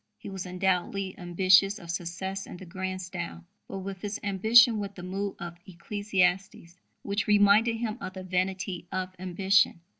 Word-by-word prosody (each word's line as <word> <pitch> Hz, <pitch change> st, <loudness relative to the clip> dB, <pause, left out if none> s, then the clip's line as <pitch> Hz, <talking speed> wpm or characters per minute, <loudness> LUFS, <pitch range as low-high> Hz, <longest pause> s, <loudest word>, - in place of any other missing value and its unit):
He -, -, -9 dB
was 190 Hz, -1 st, -5 dB
undoubtedly 185 Hz, +1 st, -1 dB
ambitious 185 Hz, +3 st, +4 dB
of 170 Hz, -4 st, -7 dB
success 185 Hz, +3 st, -4 dB
in -, -, -9 dB
the 185 Hz, -, -10 dB
grand 185 Hz, +1 st, -4 dB
style. 85 Hz, -, -6 dB, 0.2 s
But 195 Hz, -1 st, -6 dB
with 190 Hz, -1 st, -7 dB
his 205 Hz, 0 st, -4 dB
ambition 220 Hz, +3 st, +5 dB
went 200 Hz, -1 st, -5 dB
the 180 Hz, -, -9 dB
mood 195 Hz, +2 st, -3 dB
of 170 Hz, 0 st, -8 dB
Ecclesiastes, 185 Hz, -1 st, -1 dB, 0.2 s
which 200 Hz, 0 st, -1 dB
reminded 210 Hz, +2 st, +5 dB
him 225 Hz, 0 st, -3 dB
of 185 Hz, -, -5 dB
the 190 Hz, -1 st, -7 dB
vanity 185 Hz, 0 st, -2 dB
of 185 Hz, 0 st, -3 dB
ambition. 190 Hz, 0 st, +2 dB
190 Hz, 160 wpm, -28 LUFS, 180-200 Hz, 0.2 s, ambition